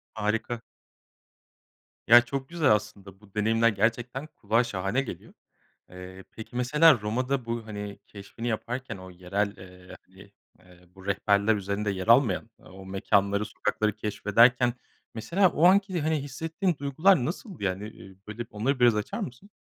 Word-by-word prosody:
Harika. 115 +2 -2 1.5
Ya, 120 +1 +9
çok 135 +1 -5
güzel 165 -8 +2
aslında 100 -2 -2
bu 105 -2 -21
deneyimler 115 +2 +3
gerçekten 120 +7 -1
kulağa 115 -2 0
şahane 100 +5 -1
geliyor. 135 - -9 0.6
Eee, 90 +1 -11
peki 110 +2 -11
mesela 145 +1 +4
Roma'da 125 +4 -2
bu, 115 -1 -4
hani, 105 -1 -7
keşfini 105 +4 -8
yaparken 120 +1 -4
o 95 0 -11
yerel, 95 +3 -2
eee, 90 0 -13
hani, 100 +2 -17 0.3
eee, 90 -1 -20
bu 95 0 -14
rehberler 100 +2 +2
üzerinde 100 +1 -2
yer 95 +1 -5
almayan 115 -3 +3
o 95 0 -14
mekânları, 100 +1 +1
sokakları 105 +1 -2
keşfederken 115 +4 +3 0.4
mesela 175 - +2
o 165 +2 +2
anki, 190 -2 +4
hani, 160 +1 +1
hissettiğin 160 +4 -2
duygular 145 +1 +3
nasıldı? 175 - -6
Yani, 100 +3 -2
eee, 95 -3 -14
böyle, 115 +3 -6
onları 125 +6 -1
biraz 120 -3 +5
açar 105 - -3
mısın? 125 +12 -7
110 Hz, 145 wpm, -27 LUFS, 100-130 Hz, 1.5 s, Ya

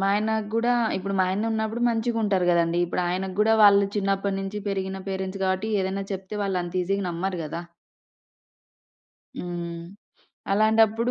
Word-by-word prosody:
మా 195 - +2
ఆయన 215 +1 0 0.2
గూడా 240 +2 +2 0.2
ఇప్పుడు 195 +1 -3
మా - - +4
ఆయనున్నప్పుడు 220 +3 -1
మంచిగా 230 0 0
ఉంటరు 185 -3 +1
కదండీ. 170 0 +2
ఇప్పుడు 175 +1 -2
ఆయనకి 185 +1 -3
గూడా 220 +1 +4
వాళ్ళు 200 -1 +7
చిన్నప్పటినుంచి 195 0 -1
పెరిగిన 190 -1 -3
పేరెంట్స్ 190 0 -4
గాబట్టి, 190 +4 0
ఏదైనా 190 +1 -2
చెప్తే 195 +2 -5
వాళ్ళంత 180 -1 -1
ఈజీగా 195 +2 -1
నమ్మరు 180 +1 -3
గదా. 165 +3 -5 1.8
హ్మ్. 170 -1 -5 0.7
అలాంటప్పుడు 220 +2 +3
195 Hz, 135 wpm, -25 LUFS, 185-215 Hz, 1.8 s, వాళ్ళు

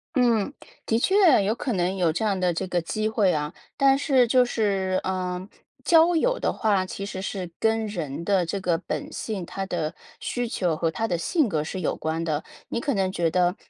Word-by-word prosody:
嗯。 240 -3 +3 0.4
的 225 - +2
确 375 - +5
有 205 +3 +1
可 245 +2 -3
能 180 0 0
有 175 -3 +2
这 220 +8 -1
样 200 -3 +1
的 180 -1 +2
这 170 - -2
个 180 -1 0
机 215 +6 -2
会 215 -4 +2
啊， 150 -1 -2 0.2
但 275 -1 +5
是 265 -3 +3
就 255 +2 +5
是， 195 -6 0
呃， 185 0 -3 0.4
交 335 +1 +5
友 - - +2
的 - - +1
话， 205 -4 +1
其 195 +1 -6
实 195 -2 -5
是 185 -2 -4
跟 225 0 +1
人 170 -6 -5
的 195 -2 +3
这 175 +4 -3
个 180 -3 +1
本 - - -5
性， 200 -5 -4
他 195 +2 -5
的 165 -3 -2 0.3
需 245 -1 -2
求 180 -7 0
和 165 +1 0
他 220 +8 -2
的 180 - 0
性 290 - +1
格 155 -7 -1
是 185 +4 -5
有 - - 0
关 160 +1 -2
的。 155 -2 -1 0.3
你 - - -2
可 280 +1 -1
能 190 -1 +1
觉 170 -3 +1
得： 180 +2 +2
195 Hz, 230 characters per minute, -25 LUFS, 175-225 Hz, 0.4 s, 确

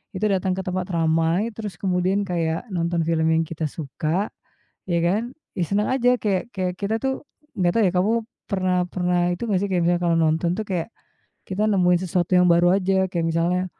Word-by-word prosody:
Itu 185 - -1
datang 185 -1 0
ke - - -1
tempat 185 0 -2
ramai 165 +5 +1
terus 210 -5 -6
kemudian 185 +1 +1
kayak 165 +3 -1
nonton 170 -1 0
film 160 -1 +1
yang 160 0 +3
kita 160 -1 -3
suka, 160 +6 -2 0.6
ya 175 -2 +1
kan, 215 +9 0 0.2
ya 180 - +1
senang 205 +4 0
aja 250 -1 +3
kayak 210 +3 -1
kayak 185 -2 -1
kita 215 +2 -1
tuh 265 +2 -2 0.3
nggak 175 -2 +2
tahu 230 - +3
ya, - - -10
kamu 185 +4 +2 0.4
pernah 185 -2 0
pernah 180 0 0 0.2
itu 235 +6 -5
nggak 200 -3 +2
sih 200 - -1
kayak 180 -2 +2
misalnya 175 0 +1
kalau 170 -1 +2
nonton 160 +2 +2
tuh 220 - -2
kayak 185 +3 -3 0.6
kita 195 +3 -1
nemuin 180 -4 +3
sesuatu 180 0 +1
yang 180 - +5
baru 175 +1 +5
aja 190 0 +1
kayak 175 -3 -2
misalnya, 170 +3 +1
180 Hz, 195 wpm, -23 LUFS, 170-195 Hz, 0.6 s, yang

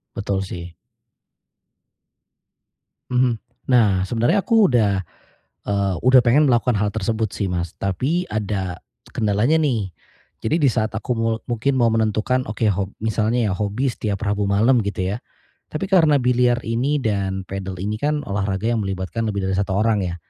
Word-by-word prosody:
Betul 100 -3 -1
sih. 90 -2 -7 2.4
Mhm. 125 -3 +1 0.3
Nah 100 -6 +4
sebenarnya 120 - +1
aku 225 -3 +4
udah, 105 -6 +2 0.6
eee, 100 -2 0
udah 130 0 +7
pengen 130 +6 +4
melakukan 120 -3 +2
hal 105 0 -1
tersebut 110 0 -1
sih, 100 -2 -2
Mas. 85 -2 -3
Tapi 135 - -1
ada, 100 -4 -3 0.3
kendalanya 110 +8 +1
nih. 125 -11 0 0.5
Jadi 110 +8 +1
di 140 - +5
saat 110 -1 -1
aku 110 +3 -4
mul 115 0 +1
mungkin 120 +4 0
mau 120 - +4
menentukan 110 +3 +1
oke 110 0 -1
hob 100 0 -1
misalnya 110 +1 0
ya - - 0
hobi 105 +7 -1
setiap 105 -4 -3
Rabu 105 0 0
malam, 115 +6 +3
gitu 95 -1 -2
ya. - - -4 0.5
Tapi 190 +5 -4
karena 160 -7 +4
biliar 125 0 +2
ini 130 +6 0
dan 100 -4 -1
padel 95 -1 -5
ini 105 +2 -2
kan 150 +4 0
olahraga 100 +1 -1
yang 115 -3 0
melibatkan 95 +4 -3
lebih 100 -3 -2
dari 95 - 0
satu 100 -1 0
orang 105 -1 +1
ya. 85 - -3
110 Hz, 155 wpm, -21 LUFS, 100-125 Hz, 2.4 s, udah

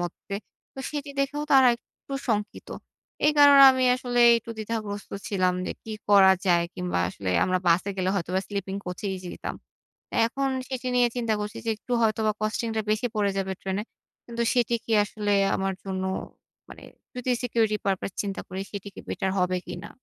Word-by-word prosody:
মধ্যে। 175 +3 -5 0.4
তো - - -12
সেটি 290 -1 -5
দেখেও 290 +2 -1
তারা 265 -2 +7
একটু 275 - -16 0.2
শঙ্কিত। 210 -1 -2 0.6
এই 300 - +5
কারণে 285 -1 +9
আমি 260 0 +1
আসলে 245 -1 -1 0.2
একটু 230 - -10
দ্বিধাগ্রস্ত 215 -2 -4 0.2
ছিলাম 185 -3 +1
যে - - -2
কি 220 - -7 0.2
করা 195 -2 +7
যায়? 170 -1 +4
কিংবা 180 - -2
আসলে 95 0 -4
আমরা 185 0 +1
বাসে 185 +4 +3
গেলে 185 0 0
হয়তোবা 185 0 -1
স্লিপিং 200 -1 -4
কোচ 180 0 -5
এই 190 - -3
যেতাম। 175 - -6 0.7
এখন 270 +4 -1 0.2
সেটি 255 -1 -4
নিয়ে 245 -1 +5
চিন্তা 230 -3 0
করছি 210 0 -5
যে - - 0
একটু 245 - -11
হয়তোবা 220 -1 +2
কস্টিং 215 +2 -1
টা 220 - +1
বেশি 215 +3 +1
পড়ে 200 -2 +1
যাবে 190 0 -1
ট্রেনে। 195 +2 -2 0.4
কিন্তু 235 0 -2
সেটি 240 -1 +2
কি 230 - -5
আসলে 205 -1 -2 0.2
আমার 195 0 -1
জন্য 190 -1 -3 0.7
মানে - - -12 0.3
যদি 250 0 -1
security 225 -3 +1
purpose 195 0 -1
চিন্তা 200 -1 -4
করি 190 +1 -5
সেটি 200 -1 -6
কি - - -10
বেটার 190 -1 -1
হবে 180 0 +1
কিনা? 180 0 -7
210 Hz, 175 wpm, -26 LUFS, 190-240 Hz, 0.7 s, কারণে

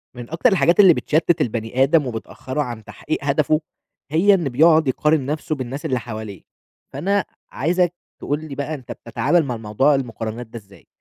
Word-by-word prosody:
من 120 -1 -9
أكتر 170 +10 +2
الحاجات 175 -2 +3
اللي 190 -4 +8
بتشتّت 160 +1 +1
البني 115 +1 0
آدم 145 0 +3
وبتأخّره 130 +4 -5
عن 120 -5 -5
تحقيق 155 - -4
هدفه 150 +2 +1 0.5
هي 185 +6 +5
إن 170 -7 +1
بيقعُد 155 +4 +4
يقارن 150 +2 +1
نَفْسه 155 +2 -2
بالناس 135 +1 -6
اللي 130 -1 0
حواليه، 110 -4 -7 0.5
فأنا 200 +2 0 0.3
عايزك 175 +4 +1 0.3
تقول 145 +1 -2
لي 145 -3 -7
بقى 145 +2 -3
أنت 130 -5 -8
بتتعامل 120 +9 0
مع 125 -3 -3
موضوع 115 +7 +2
المقارنات 115 -2 -4
ده 115 - -9
إزاي؟ 100 -2 -20
140 Hz, 170 wpm, -21 LUFS, 120-160 Hz, 0.5 s, اللي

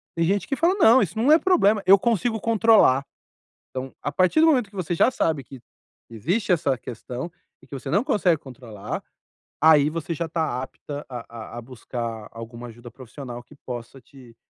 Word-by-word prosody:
Tem 165 - +1
gente 195 +2 0
que 275 - -1
fala: 340 +7 +2
"Não, 230 +3 +7
isso 205 +3 -2
não 260 +7 +3
é 320 - +7
problema! 220 - +3
Eu 195 - +9
consigo 225 0 0
controlar", 220 - +4 0.7
então, 130 0 -6
a - - -2
partir 185 - +3
do 320 - +6
momento 250 -9 +2
que 200 - -15
você 175 - -4
já 165 - +4
sabe, 160 - -1
que 135 -1 -12 0.5
que 115 - -13
existe 185 - -1
essa 155 -6 +1
questão, 125 +7 -7 0.3
e - - -18
que - - -10
você 135 +1 -7
não 200 +7 +2
consegue 180 - +2
controlar, 120 -6 -8 0.6
aí, 150 -2 +6
você 165 +1 -4
já 165 +1 -3
tá 155 -6 -2
apta 145 +2 -8
a 125 -2 -6 0.4
a - - -5
a 120 - -7
buscar 115 -3 -6
alguma 115 +1 -9
ajuda 120 +1 -12
profissional 125 0 -9
que 150 - -19
possa, 125 +1 -7
te 125 -2 -17
150 Hz, 195 wpm, -24 LUFS, 125-200 Hz, 0.7 s, Eu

